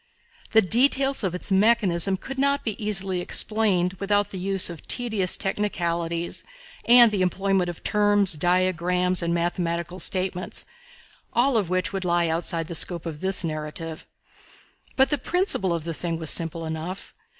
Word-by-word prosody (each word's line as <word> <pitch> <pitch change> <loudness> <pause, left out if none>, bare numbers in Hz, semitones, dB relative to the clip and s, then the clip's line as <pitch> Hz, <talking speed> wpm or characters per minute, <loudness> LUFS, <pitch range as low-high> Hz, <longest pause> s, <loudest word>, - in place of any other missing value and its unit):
The 220 -1 +6
details 270 +6 +2
of 180 -2 -1
its 180 - -3
mechanism 195 -3 +2
could 265 +7 -7
not 280 +1 +1
be 220 - -2
easily 195 -3 -1
explained, 190 -3 +1
without 205 0 0
the 190 - -6
use 195 0 +2
of 170 -3 -10
tedious 220 -7 +1
technicalities 170 -4 -2 0.4
and 240 -1 +7
the 200 -3 -1
employment 190 0 0
of 175 - -9
terms, 205 -3 +2
diagrams 180 +2 +1
and 170 0 -1
mathematical 170 0 -2
statements, 185 -1 -1 0.7
all 250 +2 +2
of 205 -6 0
which 185 +2 -1
would 195 -1 -3
lie 175 -1 +1
outside 165 0 -2
the 170 - -8
scope 170 0 -3
of 155 -3 -7
this 190 0 0
narrative. 155 0 -5 0.9
But 265 +2 +3
the 295 - +1
principle 355 - +1
of 170 -2 -2
the 165 +1 -4
thing 165 +1 -3
was 160 -2 +5
simple 165 0 -1
enough. 160 +4 -6
185 Hz, 155 wpm, -24 LUFS, 170-205 Hz, 0.9 s, and